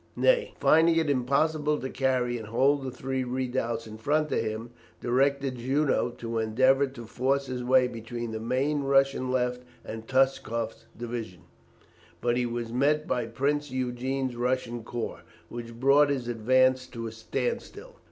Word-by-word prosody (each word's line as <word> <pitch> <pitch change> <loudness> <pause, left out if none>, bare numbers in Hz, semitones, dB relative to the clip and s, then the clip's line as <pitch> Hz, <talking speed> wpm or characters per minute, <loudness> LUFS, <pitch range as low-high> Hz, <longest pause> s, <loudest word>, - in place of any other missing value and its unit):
Ney, - - +2
finding 165 +1 +5
it 160 -3 +2
impossible 150 +3 +1
to 130 - -4
carry 130 -2 0
and 110 - -8
hold 135 +6 +2
the 130 - -3
three 130 +1 -3
redoubts 125 -2 -2
in 110 0 -10
front 150 +5 +1
of - - +2
him, 110 +2 -4 0.3
directed 135 +1 +1
Junot 130 -1 +1
to 115 -1 -3
endeavour 130 +5 +3
to 120 -3 -10
force 135 +4 0
his 125 -1 -4
way 130 0 +4
between 115 0 -6
the 110 - -4
main 135 +6 0
Russian 135 -1 +2
left 125 -1 0 0.2
and 110 0 -7
Touchkoff's 130 -4 0
division; 115 -6 -5 0.8
but 120 0 +1
he 125 0 +1
was 120 -1 -4
met 150 +4 +2
by 120 -2 -1
Prince 145 +5 -1
Eugene's 130 0 -2
Russian 120 -1 -1
corps, 120 0 -5 0.3
which 115 -1 -8
brought 140 +3 +5
his 130 -4 -1
advance 130 +3 +3
to 115 -2 -7
a 115 - -4
standstill. 475 - -4
130 Hz, 155 wpm, -28 LUFS, 120-135 Hz, 0.8 s, finding